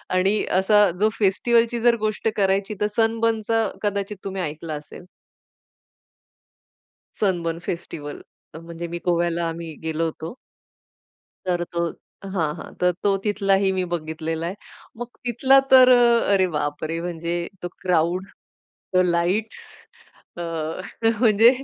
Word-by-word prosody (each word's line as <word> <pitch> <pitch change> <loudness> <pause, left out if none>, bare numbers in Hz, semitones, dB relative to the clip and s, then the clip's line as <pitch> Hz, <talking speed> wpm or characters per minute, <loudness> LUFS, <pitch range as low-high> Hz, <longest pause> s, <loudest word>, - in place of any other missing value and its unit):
आणि 195 +3 +2 0.2
असा 205 +1 +5
जो 215 +2 +4
फेस्टिव्हलची 230 +4 +2
जर 240 0 +5
गोष्ट 215 +1 -1
करायची 195 +1 +1
तर 210 - +3
सनबर्नचा 225 0 +1 0.2
कदाचित 200 0 -2
तुम्ही 195 -1 -3
ऐकलं 155 0 -5
असेल. 150 +4 -13 2.2
सनबर्न 170 -5 0
फेस्टिव्हल 145 -4 -5 0.4
म्हणजे 170 0 -6
मी, 170 +1 -5
गोव्याला 170 -1 +1
आम्ही 165 -1 -6
गेलो 160 0 -1
होतो. 160 +3 -6 1.1
तर 175 -1 0
तो 170 -1 0 0.4
हां 170 -4 +1
हां. - - -10
तर 180 0 +3
तो 200 -1 +3
तिथलाही 195 -2 +2
मी 185 -1 0
बघितलेला 160 0 -3
आहे. 180 - -3 0.4
मग 240 +1 -5 0.2
तिथला 260 +3 +4
तर, 255 -1 +8 0.4
अरे 190 -2 +4
बापरे! 150 +2 -2
म्हणजे 170 -1 -3 0.3
तो 175 - -3
क्राउड, 180 +1 +1 0.8
लाईट्स 180 +6 0 0.8
अ, 175 - -4 0.8
म्हणजे 225 -1 +6
185 Hz, 115 wpm, -23 LUFS, 170-210 Hz, 2.2 s, तर